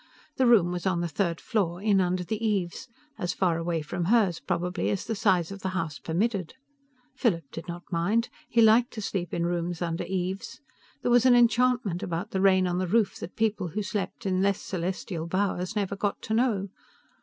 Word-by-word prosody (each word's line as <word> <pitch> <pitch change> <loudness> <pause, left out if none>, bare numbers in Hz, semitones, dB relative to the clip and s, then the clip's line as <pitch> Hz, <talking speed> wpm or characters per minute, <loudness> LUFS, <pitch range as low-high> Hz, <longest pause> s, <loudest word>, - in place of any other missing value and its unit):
The 260 - +4
room 200 -8 +5
was 180 0 -2
on 170 -2 +1
the 175 - -1
third 170 0 -1
floor 180 -6 -1
in 200 -1 +3
under 180 0 0
the 220 +4 -4
eaves 200 -2 -1 0.3
as 175 0 -1
faraway 170 -3 0
from 170 +3 -3
hers, 200 -4 +3
probably, 175 +1 -1
as 200 - -2
the 225 - -2
size 190 -5 +2
of 195 - -7
the 190 - -2
house 155 -5 -3
permitted. 190 +2 -1 0.6
Philip 175 -9 +1
did 165 - -8
not 175 0 -6
mind. 200 +8 +1 0.2
He 230 -1 +4
liked 225 +2 +5
to 220 - -5
sleep 180 -4 -3
in 170 - -1
rooms 175 0 -2
under 170 -1 -2
eaves. 190 +1 -3 0.4
There 245 - +1
was 245 +1 +5
an 250 - +7
enchantment 240 -5 +3
about 185 +1 -3
the 190 - -1
rain 190 -1 +5
on 180 0 0
the 185 - -1
roof 210 +1 +2
that - - -8
people 220 -4 0
who 205 +6 -3
slept 200 -1 -4
in 185 -1 +1
less 200 0 +2
celestial 175 -2 -4
bowers 185 +1 -1
never 200 -1 -1
got 200 0 -2
to 220 - -3
know. 220 -5 +1
190 Hz, 200 wpm, -27 LUFS, 175-215 Hz, 0.6 s, an